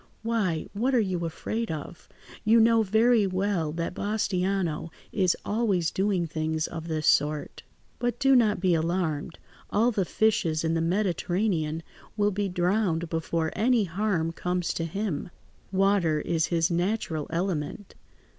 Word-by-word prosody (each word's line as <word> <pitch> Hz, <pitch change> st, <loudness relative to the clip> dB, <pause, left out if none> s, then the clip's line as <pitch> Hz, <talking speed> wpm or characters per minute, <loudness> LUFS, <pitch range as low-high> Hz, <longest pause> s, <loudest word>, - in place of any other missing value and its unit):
"Why, 210 Hz, -8 st, 0 dB
what 250 Hz, +6 st, +1 dB
are -, -, +5 dB
you 185 Hz, -5 st, -1 dB
afraid 220 Hz, +7 st, -3 dB
of? 160 Hz, +2 st, -7 dB, 0.3 s
You 225 Hz, +2 st, +5 dB
know 225 Hz, 0 st, +5 dB
very 220 Hz, +1 st, +3 dB
well 185 Hz, -4 st, -1 dB
that 170 Hz, +1 st, -3 dB
Bastiano 190 Hz, -5 st, -1 dB, 0.2 s
is 185 Hz, -4 st, +2 dB
always 205 Hz, -7 st, +1 dB
doing 190 Hz, -3 st, 0 dB
things 155 Hz, 0 st, -2 dB
of 165 Hz, 0 st, -6 dB
this 155 Hz, -2 st, -2 dB
sort. 150 Hz, 0 st, +1 dB, 0.4 s
But 240 Hz, -1 st, -1 dB
do 270 Hz, -1 st, +5 dB
not 220 Hz, -4 st, +3 dB
be 185 Hz, -1 st, +2 dB
alarmed: 165 Hz, -1 st, -1 dB, 0.3 s
all 230 Hz, +4 st, +3 dB
the 205 Hz, -4 st, 0 dB
fishes 175 Hz, -5 st, +1 dB
in 160 Hz, 0 st, +1 dB
the 165 Hz, -, +1 dB
Mediterranean 175 Hz, -2 st, 0 dB, 0.3 s
will 205 Hz, 0 st, +2 dB
be 200 Hz, 0 st, -1 dB
drowned 180 Hz, -2 st, 0 dB
before 165 Hz, 0 st, -1 dB
any 230 Hz, +1 st, +3 dB
harm 180 Hz, -3 st, -1 dB
comes 180 Hz, +1 st, -2 dB
to 165 Hz, -, -2 dB
him. 180 Hz, -3 st, -3 dB, 0.4 s
Water 190 Hz, -5 st, +2 dB
is 165 Hz, -1 st, 0 dB
his 165 Hz, 0 st, +1 dB
natural 175 Hz, -3 st, -1 dB
element. 170 Hz, +1 st, -3 dB
180 Hz, 145 wpm, -27 LUFS, 165-210 Hz, 0.4 s, are